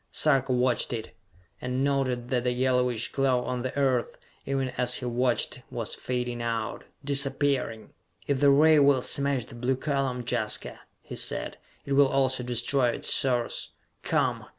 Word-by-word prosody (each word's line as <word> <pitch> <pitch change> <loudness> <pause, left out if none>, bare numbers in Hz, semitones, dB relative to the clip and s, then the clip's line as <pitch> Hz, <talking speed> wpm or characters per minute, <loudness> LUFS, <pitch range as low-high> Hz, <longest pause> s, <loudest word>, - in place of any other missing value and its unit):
Sarka 135 -3 +2
watched 125 -1 +2
it, 115 -2 -6 0.5
and 125 +1 -1
noted 130 -3 0
that 125 -1 0
the 125 0 +1
yellowish 125 -2 +1
glow 130 -2 +1
on 125 -1 -2
the 130 +2 -4
Earth, 130 -4 +1 0.3
even 135 -1 -1
as 125 -1 -1
he 125 - -4
watched, 125 +1 0
was 115 -3 -5
fading 125 -1 -3
out 115 -1 -3 0.2
disappearing! 140 -4 0 0.3
"If 140 -2 0
the 145 0 +5
ray 155 +2 +6
will 140 -3 +4
smash 140 -4 +1
the - - -14
blue 125 +2 -1
column, 135 -3 -2
Jaska," - - -1 0.2
he - - -8
said, - - -2 0.3
"it 140 - -2
will 140 0 +6
also 135 -1 +1
destroy 125 +1 +1
its - - +1
source! 125 -3 -1 0.3
Come! - - 0
130 Hz, 155 wpm, -27 LUFS, 125-135 Hz, 0.5 s, ray